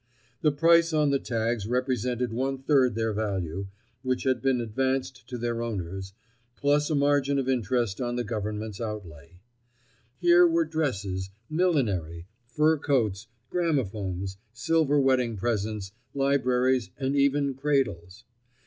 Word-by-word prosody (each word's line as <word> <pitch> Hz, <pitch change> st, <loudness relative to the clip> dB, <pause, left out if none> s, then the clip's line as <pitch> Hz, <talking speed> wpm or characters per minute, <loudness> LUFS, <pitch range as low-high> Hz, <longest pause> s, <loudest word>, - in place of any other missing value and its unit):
The 150 Hz, -, +4 dB
price 165 Hz, +3 st, +4 dB
on 150 Hz, -2 st, +3 dB
the 140 Hz, -, +2 dB
tags 115 Hz, -3 st, -2 dB
represented 125 Hz, -1 st, -1 dB
one 135 Hz, +3 st, -1 dB
third 130 Hz, -6 st, +3 dB
their 110 Hz, -1 st, 0 dB
value, 95 Hz, -3 st, -2 dB, 0.3 s
which 130 Hz, -1 st, -1 dB
had 130 Hz, -1 st, +1 dB
been 135 Hz, -2 st, +2 dB
advanced 130 Hz, +3 st, -2 dB
to 125 Hz, -, -4 dB
their 120 Hz, 0 st, -2 dB
owners, 95 Hz, -4 st, -4 dB, 0.4 s
plus 145 Hz, +2 st, +2 dB
a 155 Hz, -, +1 dB
margin 140 Hz, -1 st, +2 dB
of 135 Hz, -2 st, -1 dB
interest 120 Hz, -3 st, 0 dB
on 120 Hz, -1 st, -2 dB
the 120 Hz, -, -1 dB
Government's 105 Hz, -1 st, -4 dB
outlay. 90 Hz, -7 st, -7 dB, 0.8 s
Here 175 Hz, +2 st, +6 dB
were 165 Hz, 0 st, +2 dB
dresses, 105 Hz, -12 st, -2 dB, 0.2 s
millinery, 105 Hz, -, 0 dB, 0.2 s
fur 155 Hz, +5 st, +2 dB
coats, 115 Hz, -8 st, 0 dB, 0.2 s
gramophones, 100 Hz, -, -1 dB, 0.2 s
silver 145 Hz, +3 st, +2 dB
wedding 130 Hz, -4 st, +2 dB
presents, 105 Hz, -2 st, -2 dB, 0.2 s
libraries 130 Hz, -4 st, +2 dB
and 135 Hz, +1 st, -1 dB
even 140 Hz, 0 st, +2 dB
cradles. 125 Hz, -9 st, -1 dB
125 Hz, 130 wpm, -27 LUFS, 105-140 Hz, 0.8 s, Here